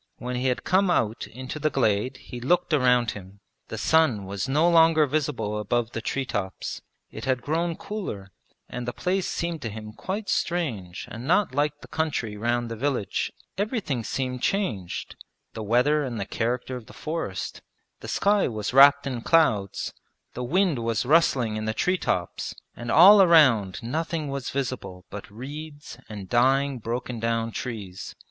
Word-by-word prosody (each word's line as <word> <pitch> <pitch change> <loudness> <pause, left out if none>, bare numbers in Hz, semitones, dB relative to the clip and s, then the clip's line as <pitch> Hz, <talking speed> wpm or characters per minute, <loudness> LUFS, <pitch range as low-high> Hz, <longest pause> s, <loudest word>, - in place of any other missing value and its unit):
When 125 +1 -4
he 125 +1 0
had 125 - 0
come 190 +1 +3
out 115 -10 0
into 130 +5 -7
the 155 +1 +1
glade 125 -1 +1
he 125 -2 -9
looked 175 +6 +1
around 125 -5 +3
him; 100 0 -11 0.3
the - - -6
sun 150 -11 +3
was 100 +6 -4
no 150 +5 +3
longer 165 -2 +5
visible 140 -7 -1
above 115 +3 -1
the 115 - -4
tree 135 +3 -2
tops. 100 -6 -4 0.3
It - - -7
had 130 -2 0
grown 165 +2 0
cooler 105 - -6 0.4
and 125 0 -6
the 120 - -2
place 185 +1 -1
seemed 170 -2 -3
to 115 - -3
him 110 0 -8
quite 200 - -4
strange 115 - -2
and 120 +4 -7
not 180 -3 +3
like 145 +1 0
the - - -11
country 145 -9 -2
round 120 +3 0
the - - -3
village. 125 -5 -1 0.3
Everything 205 - -1
seemed 125 +1 -3
changed 115 - -2 0.4
the 110 - -6
weather 125 +8 +2
and 120 -5 -4
the 100 - -2
character 120 +4 -2
of 125 -3 -9
the - - -13
forest; 155 - -4 0.4
the - - -9
sky 205 0 +2
was 110 0 -3
wrapped 140 +2 +7
in 130 -4 -3
clouds, 115 - +2 0.4
the 125 - -4
wind 170 +1 +2
was 115 0 -1
rustling 130 -7 +3
in 110 - -3
the 110 0 -2
tree 185 0 +1
tops, 90 -1 -2 0.2
and 120 0 -7
all 195 - +9
around 130 - +5
nothing 155 +4 -2
was 140 -2 -4
visible 110 -9 -4
but 105 - -8
reeds 145 +7 -9
and 100 -3 -7
dying 135 +3 +2
broken 120 +1 -4
down 115 0 -1
trees. 105 -7 -6
125 Hz, 170 wpm, -25 LUFS, 110-155 Hz, 0.4 s, all